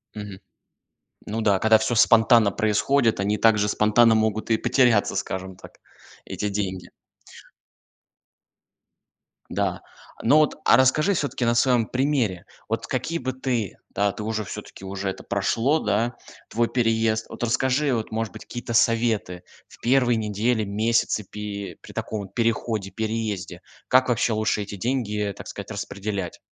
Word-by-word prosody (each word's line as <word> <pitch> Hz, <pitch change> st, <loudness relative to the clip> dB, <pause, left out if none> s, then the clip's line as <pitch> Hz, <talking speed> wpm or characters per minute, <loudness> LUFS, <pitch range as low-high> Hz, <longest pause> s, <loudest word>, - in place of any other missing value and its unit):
Мгм. 105 Hz, -2 st, -7 dB, 0.9 s
Ну 110 Hz, +2 st, -3 dB
да, 100 Hz, -3 st, +3 dB
когда 110 Hz, +1 st, +5 dB
всё 110 Hz, +2 st, -1 dB
спонтанно 115 Hz, -1 st, +5 dB
происходит, 115 Hz, +2 st, +1 dB
они 105 Hz, +2 st, 0 dB
также 105 Hz, -2 st, +3 dB
спонтанно 110 Hz, +3 st, +4 dB
могут 110 Hz, 0 st, 0 dB
и 115 Hz, -, +4 dB
потеряться, 120 Hz, -6 st, +2 dB
скажем 95 Hz, 0 st, -4 dB
так, -, -, -15 dB, 0.5 s
эти 105 Hz, -, -3 dB
деньги. 95 Hz, -3 st, -3 dB, 2.6 s
Да, -, -, -2 dB, 0.4 s
ну 140 Hz, +7 st, +4 dB
вот 155 Hz, -1 st, +3 dB
а -, -, +7 dB
расскажи, 150 Hz, +9 st, +3 dB
всё-таки, 145 Hz, -7 st, -2 dB
на 120 Hz, 0 st, +2 dB
своем 120 Hz, -2 st, +3 dB
примере, 125 Hz, -9 st, -1 dB, 0.2 s
вот -, -, -2 dB
какие 165 Hz, -, -2 dB
бы 130 Hz, 0 st, -2 dB
ты, 125 Hz, -6 st, -3 dB
да, 100 Hz, 0 st, +1 dB
ты 105 Hz, -, -7 dB
уже, 110 Hz, 0 st, -2 dB
всё-таки 95 Hz, -, -9 dB
уже 95 Hz, 0 st, -4 dB
это -, -, -7 dB
прошло, 140 Hz, +7 st, +1 dB
да, 115 Hz, +2 st, 0 dB, 0.3 s
твой 115 Hz, +1 st, +1 dB
переезд, 115 Hz, -2 st, +1 dB
вот -, -, -7 dB
расскажи, 130 Hz, +4 st, +1 dB
вот, 110 Hz, -1 st, -4 dB
может 110 Hz, -1 st, -3 dB
быть, -, -, -10 dB
какие-то 120 Hz, -1 st, -6 dB
советы 115 Hz, -6 st, +1 dB, 0.3 s
в -, -, -17 dB
первые 125 Hz, -1 st, +3 dB
недели, 110 Hz, +1 st, 0 dB
месяцы, 110 Hz, +1 st, 0 dB
пи 100 Hz, 0 st, -6 dB
при -, -, -13 dB
таком 105 Hz, -3 st, -4 dB
переходе, 110 Hz, -1 st, -1 dB
переезде. 105 Hz, -4 st, -3 dB, 0.3 s
Как 130 Hz, 0 st, +4 dB
вообще 115 Hz, -1 st, +1 dB
лучше 110 Hz, -1 st, 0 dB
эти 100 Hz, 0 st, -8 dB
деньги, 105 Hz, -2 st, -2 dB
так -, -, -10 dB
сказать, -, -, -8 dB
распределять? 100 Hz, -3 st, -5 dB
110 Hz, 145 wpm, -24 LUFS, 105-120 Hz, 2.6 s, а